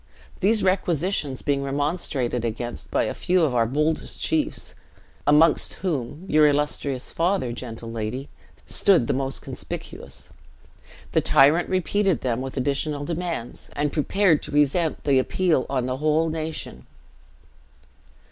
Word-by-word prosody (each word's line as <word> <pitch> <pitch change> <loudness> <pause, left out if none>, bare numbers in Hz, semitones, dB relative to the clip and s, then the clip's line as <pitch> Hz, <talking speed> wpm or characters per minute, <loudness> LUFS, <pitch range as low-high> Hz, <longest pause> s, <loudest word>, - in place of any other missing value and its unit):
These 210 +3 +5
requisitions 175 -6 0
being 140 -1 +1
remonstrated 140 -3 -1
against 120 +1 -4
by - - +1
a - - -2
few 180 -1 +1
of 145 -5 +1
our 115 -2 +2
boldest 150 +5 -1
chiefs 315 -2 -1 0.5
(amongst 150 +2 +4
whom, 150 0 -3
your 155 -2 +5
illustrious 145 -2 -1
father, 170 -7 0
gentle 115 -1 -7
lady, 115 +5 -4 0.4
stood 185 -11 +3
the - - 0
most 135 0 -2
conspicuous), - - -7 0.8
the - - +3
tyrant 150 +6 +4
repeated 190 0 +1
them 125 -1 -1
with 135 +1 -6
additional 145 +2 -1
demands, 170 -7 -4
and 145 0 -1
prepared 165 +1 +2
to - - -8
resent 150 +3 +1
the 140 -2 +3
appeal 160 +1 +1
on 130 -3 0
the 130 0 -2
whole 155 +3 +2
nation. 160 0 -5
145 Hz, 130 wpm, -24 LUFS, 130-170 Hz, 0.8 s, These